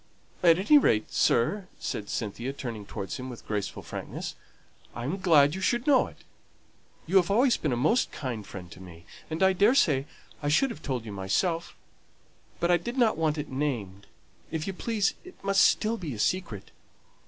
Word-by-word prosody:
At 170 -2 +6
any 290 +11 +6
rate, 110 - +1
sir," 180 - +2
said 105 - -4
Cynthia, 115 +5 -3
turning 115 -7 -6
towards 100 +1 -5
him 130 0 -6
with 120 - -10
graceful 105 -2 -3
frankness, - - -6 0.6
"I 120 - -5
am 150 +10 -2
glad 150 -6 +5
you 190 - -5
should 240 +5 +1
know 280 -3 +4
it. - - -14 0.9
You 185 +4 +3
have 180 -2 +3
always 240 +5 +4
been 150 - -2
a 120 - 0
most 155 - +2
kind 125 -7 -5
friend 90 -3 -10
to 90 - -11
me, 85 -2 -12 0.2
and 160 +3 -1
I 190 0 +5
daresay 185 - +3 0.4
I 145 - -1
should 250 - +3
have - - -9
told 125 -4 -3
you 110 - -6
myself, 165 - -1 0.8
but 170 +1 +2
I 175 - +5
did 240 +9 -6
not 235 -4 +3
want 160 -1 0
it 150 0 -4
named; 120 -9 -3 0.4
if 160 -1 -3
you 195 - -3
please, 210 +1 0
it 365 +1 -13
must 195 0 +3
still 225 +1 +2
be 155 - -5
a - - -8
secret. 115 - -2
155 Hz, 190 wpm, -28 LUFS, 115-195 Hz, 0.9 s, At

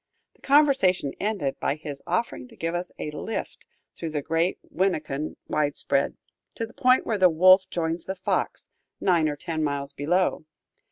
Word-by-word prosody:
The - - -31
conversation 270 - +3
ended 200 -10 -1
by 140 - 0
his 150 -3 -7
offering 180 +8 -1
to 235 - -17
give 165 -4 -3
us 175 +1 -3
a 150 - -4
"lift" 220 +8 -5 0.3
through 165 - -4
the 150 -2 -3
great 165 +4 0
Winneconne 155 -5 -1
widespread, 145 -1 0 0.4
to 230 - -2
the 225 - -16
point 255 +1 +3
where 215 -3 -1
the 185 -1 +7
Wolf 185 +3 +6
joins 165 -1 -2
the 190 - -3
Fox, 185 - -2 0.3
nine 170 -5 +3
or 145 - -3
ten 160 +2 -3
miles 140 -1 -2
below. 170 +3 0
170 Hz, 165 wpm, -26 LUFS, 150-190 Hz, 0.4 s, the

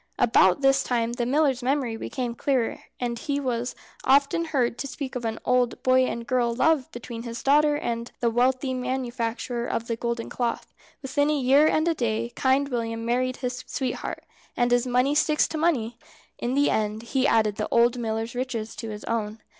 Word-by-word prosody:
About 200 -2 +4
this 270 0 +4
time 235 -1 -1
the 240 -1 -2
miller's 275 -1 +2
memory 255 -2 0
became 245 +1 -4
clearer, 250 -1 0 0.2
and 235 -2 -2
he 285 -1 -2
was 245 -2 -2 0.3
often 280 +5 +3
heard 250 -6 0
to 275 - -3
speak 265 0 -6
of 245 -2 -3
an 225 0 -2
old 250 -1 +1
boy 255 0 +4
and 235 0 -4
girl 240 -1 +1
love 305 +1 +2
between 235 -1 -7
his 235 0 -6
dear 275 - +3
daughter 300 0 +4
and 235 -4 -3
the 235 -1 +1
wealthy 255 +2 +1
manufacturer 245 -2 -3
of 230 - -2
the 230 - -2
golden 235 0 -3
cloth. 240 -2 -3 0.3
Within 285 +2 +1
a 300 - +2
year 275 +3 +5
and 315 +1 +2
a 335 - +3
day 235 -3 -2
Kind 270 +2 +2
William 230 -2 -3
married 255 +2 0
his 250 0 -3
sweetheart, 260 -3 -3 0.3
and 245 0 +2
as 245 +1 +2
money 250 +3 +2
sticks 300 0 +3
to 320 - -4
money, 240 -8 0 0.4
in 245 +2 -1
the 285 +1 +3
end 215 +1 -1
he 265 +3 +1
added 215 -5 +2
the - - -2
old 235 +1 +3
miller's 225 0 -2
riches 240 -3 -4
to 225 - -5
his 210 -1 -7
own. 220 -1 -2
245 Hz, 195 wpm, -25 LUFS, 235-270 Hz, 0.4 s, year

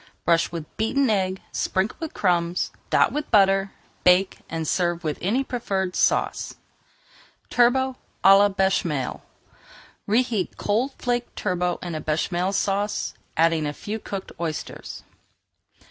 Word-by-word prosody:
Brush 170 -1 +3
with 165 -3 -5
beaten 245 +3 +2
egg, 190 -2 0
sprinkle 190 +3 -1
with 320 -2 -6
crumbs, 175 -2 +1 0.2
dot - - +4
with 295 0 -3
butter, 195 -1 +4 0.3
bake, 180 +2 +4
and 160 -1 -3
serve 175 0 0
with 155 -2 -2
any 230 +9 +1
preferred 195 -8 -2
sauce. - - +1 1.0
TURBOT 260 +2 +3 0.3
À 195 +1 +8
LA 205 0 +5
BÉCHAMEL 190 -8 0 0.9
Reheat 225 -3 0
cold 235 +7 0
flaked 245 -1 -2
turbot 180 -3 -1
in 175 -2 -4
a 155 - -3
Béchamel 175 +5 0
Sauce, 200 +1 -1 0.2
adding 165 -1 +3
a 145 - -3
few 215 +8 -5
cooked 195 -2 -6
oysters. 160 -3 -5
195 Hz, 130 wpm, -24 LUFS, 175-220 Hz, 1.0 s, À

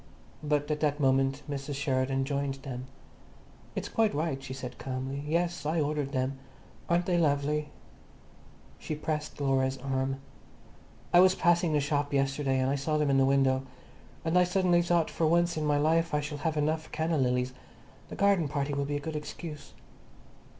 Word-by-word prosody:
But 150 0 0
at 150 - -1
that 150 -1 +1
moment 135 0 +2
Mrs. 140 0 -4
Sheridan 135 -1 0
joined 140 -1 -1
them. 130 -2 -7 0.9
"It's - - -3
quite 220 -8 +1
right," 150 -3 -1
she 130 -1 -8
said 125 -2 -7
calmly. 135 +2 -4
"Yes, 170 +2 0
I 155 +3 0
ordered 145 -2 -1
them. 135 0 -1 0.5
Aren't 175 0 +2
they 175 -1 +2
lovely?" 150 -1 +1 1.1
She 155 - -4
pressed 150 0 -4
Laura's 135 -1 +1
arm. 135 0 -2 0.9
"I 175 - +8
was 185 +1 +6
passing 170 -1 +3
the 150 - +3
shop 145 0 -1
yesterday, 135 0 +1
and 130 +1 +1
I 140 - +1
saw 150 +2 0
them 150 -2 +2
in 135 - +4
the 135 - +5
window. 135 -1 +3 0.6
And 165 +2 +3
I - - +6
suddenly 180 -1 +3
thought 170 -1 +1
for 165 - +1
once 170 +2 +3
in 155 -1 -1
my 145 -1 +3
life 165 +2 +2
I - - +3
shall 150 0 -5
have 160 0 -1
enough 155 +1 -1
canna 160 0 0
lilies. 125 0 +1 0.6
The - - -7
garden 195 -5 +3
party 140 0 -2
will 140 0 -1
be 145 +1 -2
a - - -1
good 155 +2 -5
excuse." 150 0 -7
145 Hz, 180 wpm, -29 LUFS, 135-160 Hz, 1.1 s, I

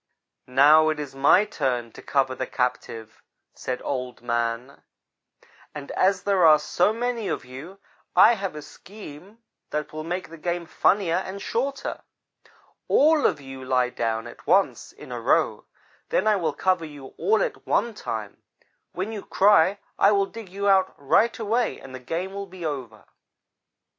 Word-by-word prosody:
"'Now, 150 +5 +6
it 155 -1 -2
is 145 -3 -6
my 140 +9 +4
turn 125 - -2
to - - -12
cover 135 -2 0
the 130 0 -4
captive,' 120 -3 -3 0.3
said 125 - -5
Old 125 -3 -4
man, 120 +2 -2 0.9
'and 145 -2 -7
as 190 0 +1
there 195 -3 +2
are 155 -2 +8
so 175 +6 +1
many 235 -1 -2
of - - -3
you, 140 +10 -10 0.4
I 230 - +7
have 195 -6 -4
a 150 - -7
scheme 200 +5 -13 0.3
that 150 0 -4
will 155 0 -5
make 180 +3 -4
the 165 - -11
game 175 +1 -2
funnier 175 0 +2
and 190 +1 -5
shorter. 270 +7 -3 0.9
All 305 +1 +4
of 155 - -2
you 135 -1 -10
lie 125 -1 +1
down 115 -2 -2
at 120 - -12
once 190 +5 +2
in - - -13
a - - -5
row. - - +1 0.4
Then - - +1
I 215 -1 +4
will 165 -6 -1
cover 185 0 +1
you 145 -4 -10
all 445 +3 +2
at - - -5
one 235 - +1
time. 110 - -6 0.5
When 190 +5 -3
you 210 -3 -6
cry 200 -1 +4 0.2
I 200 - +5
will 200 -1 +3
dig 220 -1 -10
you 200 +2 -3
out 190 -1 +3
right 180 +12 +2
away 230 +2 -1
and 130 - -12
the 130 - -7
game 170 +9 -4
will 200 0 -5
be 185 -2 -9
over.' 130 -8 -5
165 Hz, 170 wpm, -24 LUFS, 130-200 Hz, 0.9 s, are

